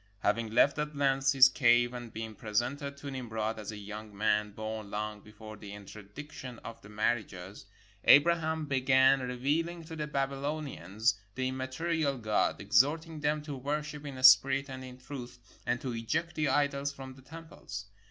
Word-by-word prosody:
Having 110 Hz, +2 st, +1 dB
left 140 Hz, +4 st, +4 dB
at 150 Hz, 0 st, -3 dB
length 135 Hz, -1 st, +2 dB
his 135 Hz, -1 st, +9 dB
cave 120 Hz, -2 st, +3 dB
and 120 Hz, -2 st, -7 dB
been 110 Hz, 0 st, -6 dB
presented 125 Hz, +7 st, -2 dB
to 140 Hz, 0 st, -7 dB
Nimrod 110 Hz, -4 st, -3 dB
as 105 Hz, 0 st, -5 dB
a 105 Hz, -, -8 dB
young 105 Hz, 0 st, -8 dB
man 105 Hz, 0 st, +2 dB
born 110 Hz, 0 st, -6 dB
long 105 Hz, 0 st, -4 dB
before 110 Hz, +1 st, -11 dB
the 105 Hz, -, -10 dB
interdic 105 Hz, +8 st, -10 dB
tion 125 Hz, -5 st, -8 dB
of 115 Hz, -, -8 dB
the 100 Hz, -, -14 dB
marriages, 105 Hz, -3 st, -3 dB, 0.4 s
Abraham 160 Hz, +1 st, +5 dB
began 130 Hz, 0 st, +4 dB
revealing 145 Hz, +7 st, -1 dB
to 160 Hz, 0 st, -8 dB
the 150 Hz, -1 st, -3 dB
Babylonians 135 Hz, -, -1 dB, 0.2 s
the 130 Hz, 0 st, -1 dB
immaterial 140 Hz, +3 st, -1 dB
God, 110 Hz, -3 st, 0 dB
exhorting 145 Hz, -, +2 dB
them 150 Hz, 0 st, 0 dB
to 150 Hz, -2 st, -5 dB
worship 150 Hz, +2 st, -3 dB
in 135 Hz, -3 st, -7 dB
spirit 135 Hz, +1 st, +6 dB
and 130 Hz, 0 st, -7 dB
in 125 Hz, -1 st, -10 dB
truth, 125 Hz, -1 st, -8 dB, 0.3 s
and 120 Hz, -, +1 dB
to 130 Hz, -3 st, -3 dB
eject 155 Hz, +9 st, -2 dB
the 155 Hz, -1 st, 0 dB
idols 140 Hz, 0 st, +1 dB
from 135 Hz, -1 st, -9 dB
the 130 Hz, -, -16 dB
temples. 135 Hz, -9 st, -9 dB
130 Hz, 165 wpm, -31 LUFS, 110-145 Hz, 0.4 s, his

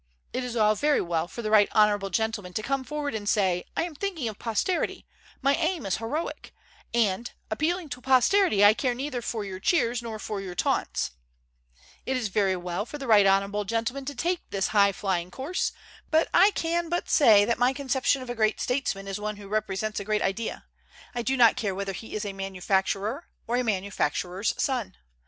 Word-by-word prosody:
It 255 Hz, -, -2 dB
is 245 Hz, -1 st, -5 dB
all 215 Hz, -2 st, +4 dB
very 295 Hz, +7 st, +2 dB
well 170 Hz, -1 st, -1 dB
for 235 Hz, -, -7 dB
the 215 Hz, -, -2 dB
right 210 Hz, -2 st, +6 dB
honorable 205 Hz, -2 st, +3 dB
gentleman 205 Hz, -1 st, -2 dB
to 215 Hz, -, -2 dB
come 275 Hz, +2 st, -1 dB
forward 295 Hz, +1 st, -3 dB
and 205 Hz, -2 st, -2 dB
say, 185 Hz, -4 st, +1 dB
'I -, -, +2 dB
am 340 Hz, -1 st, -5 dB
thinking 330 Hz, -5 st, -3 dB
of 215 Hz, -2 st, -6 dB
posterity; 235 Hz, -, -1 dB, 0.4 s
my 275 Hz, +1 st, +4 dB
aim 325 Hz, -, -1 dB
is 195 Hz, -, 0 dB
heroic; 290 Hz, +9 st, -4 dB, 0.4 s
and, 230 Hz, 0 st, +1 dB, 0.2 s
appealing 325 Hz, +8 st, 0 dB
to 250 Hz, -1 st, -6 dB
posterity, 260 Hz, -, +4 dB
I 205 Hz, -, +8 dB
care 245 Hz, +1 st, -1 dB
neither 260 Hz, -1 st, -3 dB
for 220 Hz, -2 st, -3 dB
your 190 Hz, -1 st, -6 dB
cheers 240 Hz, -, +1 dB
nor 230 Hz, -2 st, -5 dB
for 210 Hz, -1 st, -4 dB
your 185 Hz, -2 st, -7 dB
taunts,' -, -, 0 dB, 1.0 s
It 265 Hz, -, +1 dB
is 230 Hz, -5 st, -2 dB
very 195 Hz, -1 st, +2 dB
well 180 Hz, +2 st, -3 dB
for 270 Hz, +6 st, -8 dB
the 275 Hz, -, -6 dB
right 210 Hz, -4 st, +6 dB
honorable 200 Hz, +2 st, +2 dB
gentleman 230 Hz, +6 st, -2 dB
to 285 Hz, +1 st, -5 dB
take 350 Hz, +1 st, -1 dB
this 195 Hz, -1 st, -1 dB
high 200 Hz, -1 st, +4 dB
flying 180 Hz, -2 st, -2 dB
course, 275 Hz, -, -2 dB, 0.4 s
but 315 Hz, +1 st, +3 dB
I 380 Hz, +4 st, +7 dB
can 335 Hz, 0 st, -1 dB
but 350 Hz, +1 st, -1 dB
say 215 Hz, -9 st, +6 dB
that 235 Hz, +2 st, 0 dB
my 245 Hz, +1 st, +4 dB
conception 265 Hz, -1 st, 0 dB
of 255 Hz, -, -10 dB
a -, -, -2 dB
great 220 Hz, -2 st, +1 dB
statesman 250 Hz, -7 st, -1 dB
is 195 Hz, +1 st, -4 dB
one 210 Hz, 0 st, -3 dB
who 205 Hz, -1 st, -10 dB
represents 215 Hz, 0 st, -2 dB
a -, -, -4 dB
great 210 Hz, +1 st, 0 dB
idea, 195 Hz, +4 st, -3 dB, 0.5 s
I 240 Hz, -, -2 dB
do 265 Hz, +3 st, 0 dB
not 235 Hz, -2 st, +6 dB
care 200 Hz, -4 st, -2 dB
whether 195 Hz, 0 st, -3 dB
he 220 Hz, +4 st, -8 dB
is 215 Hz, 0 st, -3 dB
a 200 Hz, -, -4 dB
manufacturer 195 Hz, -, -1 dB, 0.2 s
or 240 Hz, +2 st, 0 dB
a 250 Hz, -, +1 dB
manufacturer's 195 Hz, -2 st, -1 dB
son. 245 Hz, -10 st, -1 dB
220 Hz, 200 wpm, -27 LUFS, 200-265 Hz, 1.0 s, I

